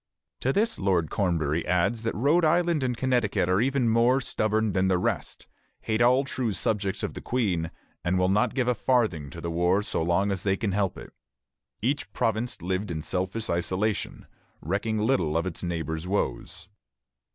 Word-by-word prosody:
To 130 - +1
this 220 +8 0
Lord 90 -5 +1
Cornbury 85 -5 0
adds 90 +6 +1
that 115 - -2
Rhode 145 +10 +3
Island 170 0 +3
and 125 -2 -1
Connecticut 120 -8 +1
are 95 +3 +2
even 135 -1 +1
more 115 +3 +4
stubborn 110 -4 0
than 95 +1 +2
the 95 -1 +3
rest, 100 -2 -2 0.4
hate 110 +1 -1
all 125 +3 +5
true 130 -5 -2
subjects 100 +2 -1
of - - -2
the - - -7
Queen, 95 -10 0 0.3
and 90 +1 +1
will 90 0 +3
not 105 +6 +2
give 130 -3 +1
a 125 - +4
farthing 110 - +1
to 85 - -9
the 85 0 -4
war 90 +4 +2
so - - -2
long 90 +5 +1
as 95 -2 -2
they 95 0 +1
can 105 -1 -1
help 100 -1 0
it. - - -11 0.7
Each 140 +5 -1
province 110 -3 -1
lived 95 +3 -2
in 80 -2 -4
selfish 95 +6 -2
isolation, 95 +5 -1 0.3
recking 105 +6 -1
little 105 - +1
of 85 - 0
its 90 -3 -4
neighbor's 80 -1 -3
woes. 80 -11 -2
100 Hz, 180 wpm, -27 LUFS, 90-120 Hz, 0.7 s, all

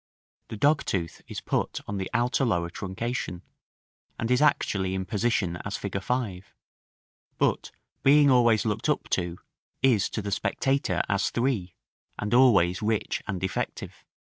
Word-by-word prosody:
The 110 - -7
dogtooth 100 - 0
is - - -6
put - - -1
on 100 - -3
the 95 -1 -3
outer 125 +3 +1
lower 85 -8 0
truncation, 95 -1 -4 0.7
and 115 +2 -2
is 125 - +3
actually 95 -10 +2
in 95 0 -2
position 100 -4 0
as 100 +3 -5
fig. 95 -1 -4
5; 100 -4 -3 0.8
but - - +1 0.3
being 145 0 +6
always 120 -4 +4
looked 105 -2 -1
up - - 0
to, 85 -1 -1 0.5
is 120 -7 +3
to 110 - -4
the 100 - -4
spectator 135 +7 0
as 100 -1 +1
3, 115 -9 -1 0.4
and 105 +1 -3
always 100 -9 +5
rich 110 0 -1
and 95 -3 -4
effective. 95 - -4
105 Hz, 145 wpm, -27 LUFS, 95-125 Hz, 0.8 s, being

